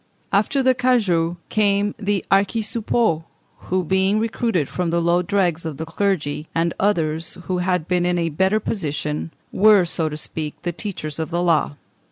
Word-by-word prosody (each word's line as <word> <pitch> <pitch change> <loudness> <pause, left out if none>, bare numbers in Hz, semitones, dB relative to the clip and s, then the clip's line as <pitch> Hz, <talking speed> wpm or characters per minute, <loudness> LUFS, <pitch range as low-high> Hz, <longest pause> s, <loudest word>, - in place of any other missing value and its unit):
After 240 +7 +2
the 260 0 +5
cagoux 200 -10 +1
came 205 -1 +2
the 205 -2 -1
archisuppôts, 210 -3 +1 0.5
who, 185 0 +1
being 190 +4 +2
recruited 225 - 0
from 180 -2 -2
the 170 +1 +1
lowest 170 +1 +1
dregs 180 -5 +1
of 160 -4 -5
the 160 - -4
clergy 160 -5 -1
and 165 +1 +1
others 165 -5 0
who 180 +1 -2
had 180 -2 0
been 180 -1 +1
in 180 0 +1
a 165 -1 0
better 190 +7 +2
position, 150 -6 -3 0.2
were, 205 -2 +5
so 165 -2 0
to 150 - -6
speak, 155 0 -4
the 175 - -1
teachers 160 -5 -5
of 160 - -2
the 175 +1 -1
law. 165 -4 +2
180 Hz, 170 wpm, -21 LUFS, 165-205 Hz, 0.5 s, the